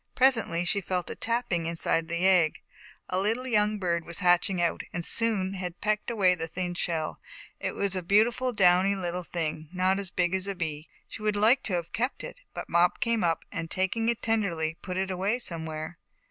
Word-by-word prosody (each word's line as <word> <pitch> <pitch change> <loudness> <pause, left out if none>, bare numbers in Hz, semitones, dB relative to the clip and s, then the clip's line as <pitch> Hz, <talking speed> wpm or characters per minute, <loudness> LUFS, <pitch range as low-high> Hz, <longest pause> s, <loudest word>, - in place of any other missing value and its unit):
Presently, 225 -10 +3
she 200 +3 +2
felt 180 -2 -2
a - - -5
tapping 230 -8 -1
inside 165 0 0
of - - -20
the 170 +2 -1
egg. 180 -5 +4 0.5
A 185 - -1
little 225 +6 0
young 210 -3 +2
bird 170 -3 -1
was 170 0 -6
hatching 180 0 +3
out, 170 -1 +1
and 170 0 -3
soon 210 -5 +1
had 180 -2 -5
pecked 210 +1 -1
away 200 -6 +3
the 165 -2 -3
thin 180 +2 -3
shell. 165 -3 -2 0.4
It - - -3
was 200 -1 0
a 185 - -1
beautiful 225 +7 +3
downy 190 -2 +4
little 180 -1 -3
thing, 160 -3 -4
not 185 +1 +1
as 195 -2 -4
big 175 0 0
as 190 +1 +1
a 200 - -2
bee. 155 -3 -4 0.2
She - - -9
would 210 -1 +1
like 225 +6 +4
to 200 - -2
have 170 -2 -2
kept 250 +4 -2
it, - - -8
but - - -6
Mop 175 +1 +3
came 230 -3 +1
up 165 -1 0
and 170 -3 -4
taking 195 +6 0
it 235 - -1
tenderly, 175 -8 0
put 185 -1 -5
it 190 0 -1
away 195 +5 0
somewhere. 160 -6 -4
185 Hz, 205 wpm, -28 LUFS, 170-210 Hz, 0.5 s, egg